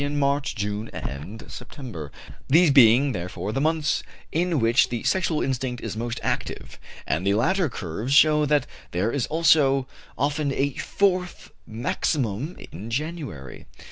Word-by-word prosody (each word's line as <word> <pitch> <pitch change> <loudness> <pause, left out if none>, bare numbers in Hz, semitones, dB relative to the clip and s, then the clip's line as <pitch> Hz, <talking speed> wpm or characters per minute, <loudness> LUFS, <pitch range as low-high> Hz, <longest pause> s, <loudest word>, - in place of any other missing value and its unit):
in 145 +1 -2
March, 140 0 0
June, 105 +1 -3
and 75 +11 -6
September, 120 - -8 0.4
these 160 +2 +5
being, 135 +1 +6
therefore, 90 +1 -4
the 135 - -1
months 155 0 +1 0.3
in 170 -1 +1
which 115 +5 +3
the 120 -2 -3
sexual 170 -5 +1
instinct 130 -2 -2
is - - -4
most 120 +1 -3
active; - - -3 0.3
and 80 +3 -1
the 100 +1 +2
later 175 - +2
curves 105 +3 -5
show 150 +1 +6
that 150 -2 +2 0.2
there 95 +6 0
is 135 -3 -1
also 145 -5 +3 0.3
often 145 +1 0
a 140 0 0
fourth 185 +1 -1 0.2
maximum 120 - -2 0.2
in 100 +7 -8
January. 135 - -5
135 Hz, 140 wpm, -24 LUFS, 110-150 Hz, 0.4 s, being